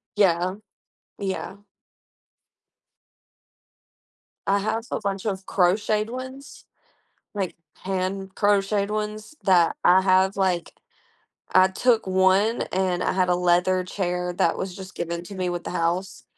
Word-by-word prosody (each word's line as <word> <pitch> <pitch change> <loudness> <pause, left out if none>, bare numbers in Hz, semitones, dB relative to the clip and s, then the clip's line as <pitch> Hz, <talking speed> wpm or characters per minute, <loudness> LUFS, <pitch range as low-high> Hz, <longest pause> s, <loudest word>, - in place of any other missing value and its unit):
Yeah, 185 -2 +2 0.6
yeah. 195 0 -4 2.9
I 200 +1 +3
have 220 +2 -1
a - - -1
bunch 195 0 -3
of 190 -2 -3
crocheted 210 +4 +1
ones, 260 +2 -8 0.7
like 195 -3 -2 0.3
hand-crocheted 195 +2 0
ones 215 +4 -4
that 180 -4 +4
I 180 +2 +6
have 190 +1 +3
like 185 -3 0 0.8
I 185 0 +7
took 225 +2 +1
one 190 +4 +3
and 185 -1 0
I - - +1
had 185 -1 +1
a 180 - +3
leather 180 +1 +2
chair 180 -1 -2
that 170 -1 +1
was 185 -1 -4
just 190 -1 -10
given 170 0 -4
to 200 - -9
me 180 -1 -1
with 175 0 -4
the - - -5
house, 180 +3 -2
190 Hz, 125 wpm, -24 LUFS, 180-205 Hz, 2.9 s, I